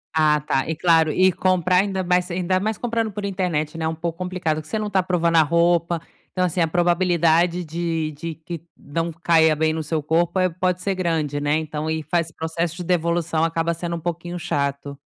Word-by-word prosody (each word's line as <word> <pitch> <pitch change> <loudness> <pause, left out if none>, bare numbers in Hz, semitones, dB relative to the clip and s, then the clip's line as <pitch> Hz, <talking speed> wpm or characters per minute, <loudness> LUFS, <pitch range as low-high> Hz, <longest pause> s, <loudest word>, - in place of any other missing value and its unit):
Ah 155 -1 +4
tá, 135 0 -1
e 160 - -1
claro, 160 -1 +3
e 185 +3 +4
comprar, 185 0 +2
ainda 190 0 +1
mais 180 0 +1
ainda 185 +1 0
mais 215 +2 -2
comprando 230 -2 -1
por 205 0 -5
internet, 170 -5 -2
né, 160 - -1
um 160 - -2
pouco 165 +1 -4
complicado, 180 -4 -2
porque 155 0 -7
você 220 - -1
não 215 -1 -2
tá 195 -2 +2
provando 170 -2 +1
a - - +8
roupa, 170 +1 +2 0.3
então, 185 -1 0
assim, 175 0 -1
a 165 - +3
probabilidade 175 0 +2
de 165 -1 -2
de 160 +2 -6
que 165 0 -8 0.2
não 165 +3 -3
caia 160 -1 +3
bem 155 +1 +1
no 160 - -2
seu 155 0 -2
corpo, 170 +4 +1
eh, 185 0 +3
pode 180 +1 -1
ser 200 - 0
grande, 160 -6 -1
né. 145 +1 +1
Então 155 0 -3
e 160 0 -2
faz 165 +2 -1
processo 165 +1 -3
de 180 - -6
devolução 170 -2 0
acaba 165 0 0
sendo 170 +1 -4
um 170 - -4
pouquinho 175 +1 -4
chato. 140 -2 -2
170 Hz, 210 wpm, -22 LUFS, 160-180 Hz, 0.3 s, a